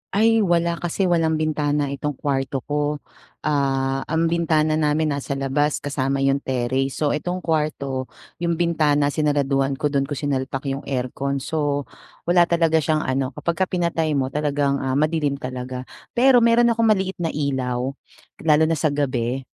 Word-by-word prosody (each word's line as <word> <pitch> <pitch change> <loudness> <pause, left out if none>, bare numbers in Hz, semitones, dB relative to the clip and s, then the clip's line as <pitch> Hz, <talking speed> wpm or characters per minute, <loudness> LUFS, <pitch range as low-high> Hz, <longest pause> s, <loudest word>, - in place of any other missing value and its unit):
Ay 225 +2 +4
wala 170 -4 +1
kasi 175 +3 -2
walang 165 -3 +2
bintana 150 -2 0
itong 140 +1 -3
kwarto 135 -2 -2
ko. 150 0 -1 0.5
Ah 135 -2 0
ang 165 +1 +1
bintana 155 -2 +2
namin 155 0 +1
nasa 140 0 -3
labas 140 +2 0
kasama 135 -1 -1
yung 135 0 +2
terrace 130 +1 -1
so 150 -2 0
itong 175 +4 -3
kwarto 140 -5 -1 0.3
yung 170 -1 0
bintana 150 -4 +2
sinaraduhan 140 -3 +1
ko 150 - +1
dun 140 -1 0
kung 145 - -2
sinalpak 135 -2 -2
yung 135 +1 -3
aircon 135 +1 -2
so 145 0 -1 0.4
wala 175 0 +5
talaga 165 -2 +3
siyang 155 0 +1
ano 130 0 -1
kapag 170 -1 -1
ka - - +2
pinatay 170 -3 0
mo 130 -1 +1
talagang 145 -1 0
ah 130 0 -1
madilim 155 -2 +1
talaga 125 0 -5 0.3
pero 255 +1 +6
meron 235 +1 +5
akong 230 0 +2
maliit 190 -2 0
na 165 - 0
ilaw 130 -3 -1 0.6
lalo 150 +1 +5
na 165 - +1
sa 155 0 +1
gabi 130 -3 -1
145 Hz, 160 wpm, -22 LUFS, 135-160 Hz, 0.6 s, pero